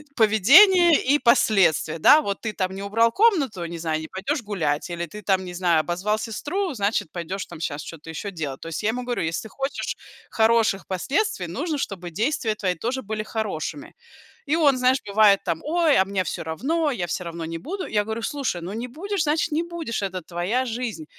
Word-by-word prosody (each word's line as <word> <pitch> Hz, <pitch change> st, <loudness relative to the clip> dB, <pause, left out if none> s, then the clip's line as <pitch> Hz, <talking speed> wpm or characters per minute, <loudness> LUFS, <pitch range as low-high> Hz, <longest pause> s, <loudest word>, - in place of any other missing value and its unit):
поведение 300 Hz, -, +6 dB
и 280 Hz, +3 st, +3 dB
последствия, 195 Hz, -, +3 dB
да: 295 Hz, -, +7 dB
вот 200 Hz, -7 st, -4 dB
ты 220 Hz, -2 st, -3 dB
там 185 Hz, -1 st, -2 dB
не 195 Hz, -, -6 dB
убрал 225 Hz, +3 st, +2 dB
комнату, 280 Hz, -, +2 dB
не 170 Hz, 0 st, -6 dB
знаю, 160 Hz, -1 st, -1 dB
не 160 Hz, -, -7 dB
пойдешь 235 Hz, -, -3 dB
гулять, 165 Hz, -9 st, -2 dB
или 170 Hz, 0 st, -4 dB
ты 210 Hz, +6 st, -10 dB
там, 190 Hz, -1 st, +1 dB
не 180 Hz, -, -7 dB
знаю, 175 Hz, -2 st, +2 dB
обозвал 185 Hz, +6 st, -1 dB
сестру, 335 Hz, -, -3 dB
значит 200 Hz, -6 st, -1 dB
пойдешь, 185 Hz, +3 st, -5 dB
там 170 Hz, -, -10 dB
сейчас 150 Hz, -2 st, -4 dB
что-то 165 Hz, -1 st, -10 dB
еще 180 Hz, +6 st, -5 dB
делать. 150 Hz, -7 st, -5 dB
То -, -, -8 dB
есть, 165 Hz, +5 st, -4 dB
я 210 Hz, -, +2 dB
ему 245 Hz, +3 st, -2 dB
говорю: 245 Hz, -5 st, -2 dB
"Если 160 Hz, 0 st, -2 dB
ты 220 Hz, -, -10 dB
хочешь 270 Hz, +3 st, -4 dB, 0.3 s
хороших 220 Hz, -3 st, +2 dB
последствий, 345 Hz, -, -1 dB
нужно 315 Hz, -4 st, -3 dB
чтобы 180 Hz, -7 st, -5 dB
действия 225 Hz, -, 0 dB
твои 185 Hz, -4 st, -1 dB
тоже 245 Hz, +9 st, -3 dB
были 215 Hz, +1 st, -4 dB
хорошими". 220 Hz, -, -4 dB, 0.5 s
И 295 Hz, +3 st, +1 dB
он 285 Hz, -5 st, +4 dB
знаешь 255 Hz, +1 st, +3 dB
бывает, 200 Hz, -1 st, +5 dB
там: 170 Hz, -3 st, -2 dB
"Ой, 320 Hz, -1 st, +2 dB
а 190 Hz, -, +5 dB
мне 195 Hz, -1 st, -1 dB
всё 170 Hz, -, -4 dB
равно, 290 Hz, -, -1 dB
я 185 Hz, -10 st, -2 dB
всё 180 Hz, +2 st, -3 dB
равно 170 Hz, -1 st, -6 dB
не 165 Hz, +1 st, -5 dB
буду". 370 Hz, -, -5 dB
Я 210 Hz, -1 st, +1 dB
говорю: 220 Hz, +2 st, -4 dB
"Слушай, 260 Hz, -11 st, -2 dB
ну 180 Hz, +3 st, -5 dB
не 235 Hz, +4 st, -5 dB
будешь, 375 Hz, +7 st, -3 dB
значит 310 Hz, +2 st, 0 dB
не 310 Hz, +2 st, +1 dB
будешь, 335 Hz, -11 st, -4 dB
это 185 Hz, -2 st, -3 dB
твоя 180 Hz, +10 st, -1 dB
жизнь. 230 Hz, -7 st, -4 dB
215 Hz, 205 wpm, -24 LUFS, 175-275 Hz, 0.5 s, да